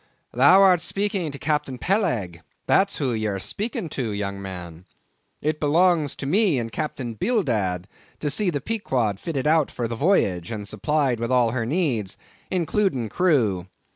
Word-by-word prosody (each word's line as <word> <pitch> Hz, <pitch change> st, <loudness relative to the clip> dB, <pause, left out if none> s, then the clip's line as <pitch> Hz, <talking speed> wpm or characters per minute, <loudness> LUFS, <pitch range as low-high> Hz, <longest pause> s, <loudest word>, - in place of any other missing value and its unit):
"Thou 160 Hz, +11 st, +6 dB
art 180 Hz, -3 st, +5 dB
speaking 195 Hz, -2 st, -1 dB
to 140 Hz, -, -7 dB
Captain 150 Hz, -3 st, -1 dB
Peleg—that's 125 Hz, -, 0 dB
who 135 Hz, -5 st, 0 dB
ye 110 Hz, -1 st, -1 dB
are 100 Hz, -2 st, -2 dB
speaking 215 Hz, -, -4 dB
to, 125 Hz, -6 st, -3 dB
young 100 Hz, -1 st, -3 dB
man. 90 Hz, -3 st, -8 dB, 0.6 s
It 155 Hz, +1 st, 0 dB
belongs 160 Hz, -1 st, +2 dB
to -, -, -6 dB
me 185 Hz, +1 st, +3 dB
and 115 Hz, -2 st, -3 dB
Captain 125 Hz, 0 st, -4 dB
Bildad 110 Hz, -, 0 dB, 0.3 s
to 150 Hz, -, -1 dB
see 185 Hz, +7 st, +1 dB
the 145 Hz, -5 st, -2 dB
Pequod 130 Hz, -, -1 dB
fitted 145 Hz, -5 st, -3 dB
out 155 Hz, -1 st, +3 dB
for 120 Hz, -, -3 dB
the 115 Hz, -, -4 dB
voyage, 100 Hz, -, +1 dB
and 105 Hz, -3 st, -5 dB
supplied 130 Hz, +4 st, 0 dB
with 115 Hz, +1 st, -2 dB
all 125 Hz, -3 st, +3 dB
her 120 Hz, -2 st, -2 dB
needs, 125 Hz, -, -1 dB, 0.3 s
including 175 Hz, -, 0 dB
crew. 115 Hz, -, +1 dB
135 Hz, 160 wpm, -24 LUFS, 110-175 Hz, 0.6 s, Thou